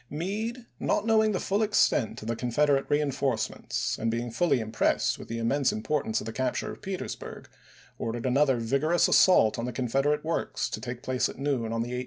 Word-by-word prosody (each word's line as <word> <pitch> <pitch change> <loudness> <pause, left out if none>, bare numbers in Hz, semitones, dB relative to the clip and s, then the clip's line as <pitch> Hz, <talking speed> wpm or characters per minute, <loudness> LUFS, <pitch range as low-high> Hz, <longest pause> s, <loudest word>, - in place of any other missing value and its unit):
Meade, 215 - -4
not 210 - 0
knowing 220 -1 +4
the 190 - -1
full 200 +2 0
extent 205 - +2
of - - -7
the 115 - -1
Con 125 +2 -3
federate 140 +2 +2
reinforcements, 140 -4 -1
and 115 - 0
being 120 +1 -2
fully 145 -1 +2
impressed 110 -1 0
with - - -9
the 115 - -4
immense 125 +4 +1
importance 135 +1 -1
of - - -7
the 115 - -5
capture 130 0 -2
of - - -11
Petersburg, 190 -1 -6 0.5
ordered 115 +1 -3
another 135 0 +3
vigorous 140 +9 +2
assault 115 - +5
on 115 - -2
the 125 - -3
Confederate 135 +5 0
works 165 - -2
to - - -4
take 120 0 -6
place 130 -2 0
at - - -9
noon 135 -5 -1
on 115 0 -1
the 120 - -6
18th. 125 - -2
135 Hz, 200 wpm, -28 LUFS, 115-155 Hz, 0.5 s, assault